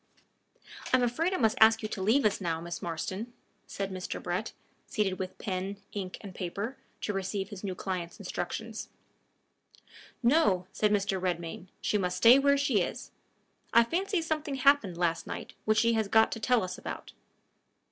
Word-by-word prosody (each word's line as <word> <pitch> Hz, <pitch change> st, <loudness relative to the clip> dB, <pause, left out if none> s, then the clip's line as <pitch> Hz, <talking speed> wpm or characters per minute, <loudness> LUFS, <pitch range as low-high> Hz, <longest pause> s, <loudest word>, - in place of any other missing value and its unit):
"I 255 Hz, -, +6 dB
am 250 Hz, -, +1 dB
afraid 280 Hz, +10 st, +1 dB
I 375 Hz, -, 0 dB
must 220 Hz, -3 st, +2 dB
ask 220 Hz, 0 st, +7 dB
you 215 Hz, -, -2 dB
to 195 Hz, -, -4 dB
leave 225 Hz, +8 st, +3 dB
us 210 Hz, -, +2 dB
now, 165 Hz, -3 st, -1 dB
Miss 170 Hz, +1 st, -6 dB
Marston," 185 Hz, +7 st, -4 dB, 0.3 s
said 195 Hz, -1 st, -4 dB
Mr. 185 Hz, -1 st, -4 dB
Brett, -, -, -2 dB, 0.4 s
seated 195 Hz, -3 st, -1 dB
with 185 Hz, -1 st, -5 dB
pen, 195 Hz, 0 st, -3 dB, 0.2 s
ink, 190 Hz, -3 st, -4 dB
and 200 Hz, -3 st, -9 dB
paper, 200 Hz, +8 st, -4 dB, 0.2 s
to 210 Hz, -, -2 dB
receive 195 Hz, 0 st, -2 dB
his 205 Hz, -1 st, -9 dB
new 190 Hz, -2 st, -3 dB
client's 180 Hz, -3 st, -4 dB
instructions. 215 Hz, +4 st, -5 dB, 1.3 s
"No," 235 Hz, -, +4 dB
said 210 Hz, -1 st, +2 dB
Mr. 200 Hz, -2 st, +1 dB
Redmain; 175 Hz, -1 st, -3 dB
"she 210 Hz, -, +1 dB
must 180 Hz, -1 st, -1 dB
stay 235 Hz, +8 st, +8 dB
where 280 Hz, 0 st, +4 dB
she 275 Hz, -8 st, +2 dB
is. -, -, -4 dB, 0.6 s
I 235 Hz, -, +8 dB
fancy 365 Hz, -, 0 dB
something 310 Hz, -3 st, -2 dB
happened 265 Hz, -9 st, +3 dB
last 170 Hz, -2 st, 0 dB
night -, -, -6 dB
which 215 Hz, 0 st, +3 dB
she 230 Hz, +1 st, +4 dB
has 220 Hz, -2 st, +1 dB
got 220 Hz, +2 st, +5 dB
to 225 Hz, -, -3 dB
tell 245 Hz, 0 st, +3 dB
us 185 Hz, -, -5 dB
about." -, -, -7 dB
205 Hz, 175 wpm, -30 LUFS, 185-235 Hz, 1.3 s, stay